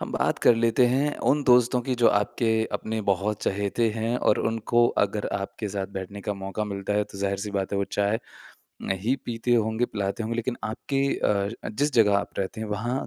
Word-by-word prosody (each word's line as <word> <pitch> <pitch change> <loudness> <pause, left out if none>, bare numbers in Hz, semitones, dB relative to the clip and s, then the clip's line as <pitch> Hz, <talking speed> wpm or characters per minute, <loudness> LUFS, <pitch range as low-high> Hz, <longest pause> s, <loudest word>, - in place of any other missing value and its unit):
हम - - -5
बात - - 0
कर - - +7
लेते 115 +2 +3
हैं 140 +4 +1
उन 145 +1 +2
दोस्तों 125 0 +5
की 130 - +2
जो - - +8
आपके 110 +3 -1 0.2
अपने 110 0 -2
बहुत 100 +2 -1
चहेते 100 +4 0
हैं 115 +2 0
और 105 - +2
उनको 115 +2 +2 0.2
अगर 100 +1 -3
आपके 105 +2 -5
साथ 95 -1 -3
बैठने 100 +2 -7
का 105 - -1
मौका 95 +2 -3
मिलता 100 -1 -3
है। - - 0
तो 100 - -12
ज़ाहिर-सी 100 +1 -2
बात 95 +1 -3
है 100 - +1
वो 100 - +1
चाय 100 +2 +2 0.6
नहीं 100 +7 0
पीते 120 +1 0
होंगे, 110 +1 +1
पिलाते 100 +2 -2
होंगे 115 +2 -2
लेक़िन 120 +1 -2
आपके 135 +5 -1
अ, 100 +2 -1
जिस 145 +7 0
जगह 105 -3 +5
आप - - -5
रहते 100 +3 -3
हैं 110 - -4
वहाँ 120 +6 -2
110 Hz, 200 wpm, -26 LUFS, 100-120 Hz, 0.6 s, जो